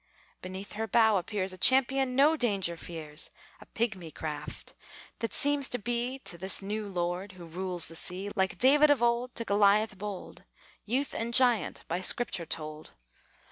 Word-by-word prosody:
Beneath 190 +2 -8
her 225 +1 -3
bow 220 -2 +4
appears 190 0 -2
A 185 - -11
champion 265 +2 +4
no 290 +4 +5
danger 200 - 0
fears; 160 -2 -4 0.3
A - - -14
pigmy 210 -8 -3
craft, 150 -1 -7 0.5
that 230 - -3
seems 285 -1 +1
to 245 - -1
be 240 +3 -2
To 170 - -4
this 190 +2 +3
new 210 +2 -4
lord 180 +1 -3
who 180 -2 -11
rules 180 +1 -3
the 165 - -11
sea, 185 +4 -4
Like 190 0 0
David 295 +4 +5
of 285 -4 +3
old 240 +1 0
to 230 - +1
Goliath 205 0 +3
bold 205 -2 -7 0.4
Youth 265 +6 -1
and 230 +1 -1
giant, 245 -4 +4
by 175 +2 -2
Scripture 190 -4 +1
told. 155 0 -6
205 Hz, 165 wpm, -29 LUFS, 180-240 Hz, 0.5 s, no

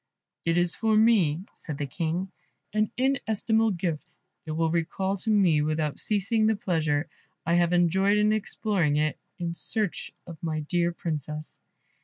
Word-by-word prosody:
"It 165 +1 +2
is 175 0 +2
for 220 -1 +2
me," 190 -8 +4
said 150 -4 -7
the 145 - -2
King, 170 +6 -3 0.4
"an 215 0 +1
inestimable 225 -4 +2
gift 170 -5 -2 0.4
it - - -3
will 160 0 +1
recall 175 +4 -1
to 220 - -3
me 185 -8 +4
without 155 -1 -1
ceasing 215 +1 +2
the 220 - +3
pleasure 160 -6 0 0.4
I 170 - +1
have 175 0 +3
enjoyed 190 +4 +3
in 210 +1 +3
exploring 200 -7 0
it 150 -1 0 0.2
in 170 -2 -3
search 210 +2 -2
of 170 -3 -10
my 155 -2 -2
dear 170 +3 0
Princess." 155 -2 -5
175 Hz, 155 wpm, -27 LUFS, 160-210 Hz, 0.4 s, me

